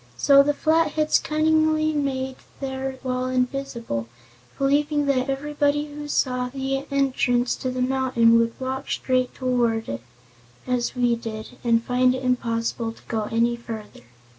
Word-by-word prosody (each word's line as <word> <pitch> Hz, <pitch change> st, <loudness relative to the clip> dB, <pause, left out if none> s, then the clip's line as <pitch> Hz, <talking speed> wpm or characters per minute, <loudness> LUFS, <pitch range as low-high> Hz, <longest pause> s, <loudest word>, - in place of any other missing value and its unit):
So 275 Hz, -, +6 dB
the 290 Hz, +1 st, +1 dB
Flatheads 310 Hz, -1 st, +2 dB
cunningly 310 Hz, 0 st, +2 dB
made 265 Hz, -3 st, -2 dB, 0.2 s
their 265 Hz, -1 st, -4 dB
wall 255 Hz, 0 st, -1 dB
invisible, 250 Hz, -, -2 dB, 0.5 s
believing 290 Hz, +2 st, +2 dB
that 265 Hz, -2 st, +1 dB
everyone 290 Hz, +1 st, 0 dB
who 295 Hz, 0 st, -5 dB
saw 250 Hz, -3 st, 0 dB
the 270 Hz, +1 st, -3 dB
entrance 255 Hz, -3 st, +1 dB
to 255 Hz, -, -3 dB
the 255 Hz, 0 st, -1 dB
mountain 250 Hz, -3 st, +3 dB
would 230 Hz, +2 st, -1 dB
walk 265 Hz, +1 st, -4 dB
straight 255 Hz, -1 st, 0 dB
toward 240 Hz, -3 st, 0 dB
it, 115 Hz, 0 st, -4 dB, 0.6 s
as 250 Hz, -1 st, -1 dB
we 245 Hz, -1 st, +2 dB
did, 220 Hz, -2 st, -6 dB
and 230 Hz, -1 st, +3 dB
find 250 Hz, +1 st, +2 dB
it 260 Hz, -, -5 dB
impossible 230 Hz, -2 st, -1 dB
to -, -, -20 dB
go 220 Hz, -2 st, -1 dB
any 235 Hz, +1 st, +2 dB
farther. 225 Hz, -3 st, -8 dB
255 Hz, 140 wpm, -24 LUFS, 240-280 Hz, 0.6 s, So